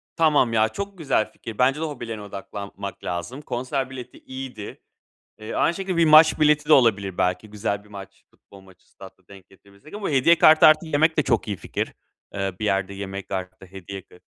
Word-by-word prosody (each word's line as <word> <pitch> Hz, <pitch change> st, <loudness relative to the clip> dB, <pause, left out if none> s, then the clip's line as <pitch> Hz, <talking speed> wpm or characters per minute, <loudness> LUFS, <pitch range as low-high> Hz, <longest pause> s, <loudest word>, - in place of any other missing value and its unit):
Tamam 150 Hz, -8 st, +3 dB
ya, 110 Hz, 0 st, +3 dB
çok 200 Hz, -, -6 dB
güzel 140 Hz, -9 st, 0 dB
fikir. 115 Hz, -2 st, -10 dB
Bence 135 Hz, +3 st, +2 dB
de -, -, -3 dB
hobilerine 120 Hz, -7 st, -6 dB
odaklanmak 100 Hz, -1 st, -8 dB
lazım. 90 Hz, -, -5 dB
Konser 130 Hz, 0 st, -3 dB
bileti 125 Hz, -2 st, -10 dB
iyiydi. 130 Hz, -5 st, -9 dB, 0.6 s
Eee, 110 Hz, +1 st, -7 dB
aynı 170 Hz, -, +1 dB
şekilde 190 Hz, -1 st, -3 dB
bir 170 Hz, -, +4 dB
maç 155 Hz, 0 st, +6 dB
bileti 150 Hz, 0 st, +3 dB
de 155 Hz, -, +5 dB
olabilir. 100 Hz, -8 st, +3 dB
Belki 90 Hz, +3 st, -1 dB
güzel 100 Hz, -1 st, -3 dB
bir -, -, -20 dB
maç, 100 Hz, -2 st, -12 dB
futbol 100 Hz, -, -18 dB
maçı 95 Hz, -1 st, -21 dB
statta 95 Hz, -1 st, -15 dB
denk 95 Hz, -2 st, -15 dB
getirebilirsek 100 Hz, -, -18 dB
ama 205 Hz, -5 st, -4 dB
hediye 150 Hz, +5 st, +4 dB
kartı 155 Hz, 0 st, +7 dB
artı 155 Hz, +1 st, +5 dB
yemek 160 Hz, +1 st, +2 dB
de 150 Hz, -, +3 dB
çok 110 Hz, -, 0 dB
iyi 100 Hz, -, -2 dB
fikir. 85 Hz, -, -5 dB, 0.4 s
Eee, 95 Hz, -1 st, -2 dB
bir -, -, -2 dB
yerde 100 Hz, -1 st, -1 dB
yemek 100 Hz, 0 st, -7 dB
artı, 95 Hz, 0 st, -6 dB
eee, 90 Hz, -, -26 dB
hediye 95 Hz, 0 st, -8 dB
k 90 Hz, -, -20 dB
110 Hz, 195 wpm, -23 LUFS, 100-150 Hz, 0.6 s, kartı